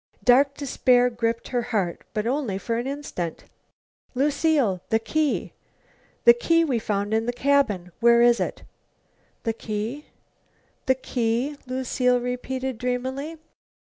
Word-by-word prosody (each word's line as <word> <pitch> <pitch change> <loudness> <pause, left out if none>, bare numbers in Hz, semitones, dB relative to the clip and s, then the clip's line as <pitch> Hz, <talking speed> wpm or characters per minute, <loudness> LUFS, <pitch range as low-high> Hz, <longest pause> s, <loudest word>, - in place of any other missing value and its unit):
Dark 275 +3 +5
despair 250 -3 +2
gripped 230 0 -2
her 245 -2 0
heart. 205 -7 -2
But 210 0 -1
only 250 -6 -1
for 230 +3 -2
an 245 - -3
instant. 270 - -5 0.7
"Lucile, 280 - +2
the 220 - +3
key! 300 +6 -1 0.7
The 475 - +10
key 335 -9 +2
we 265 -7 0
found 205 0 -2
in 225 +1 +1
the - - +2
cabin! 245 -9 +1
Where 235 0 +5
is 240 0 +5
it?" - - -3 0.8
"The 225 - 0
key 225 +6 -5 0.8
the 260 - +4
key?" 245 +2 -1
Lucile 255 -1 +1
repeated 250 0 -4
dreamily. 260 +5 -3
250 Hz, 130 wpm, -24 LUFS, 225-275 Hz, 0.8 s, The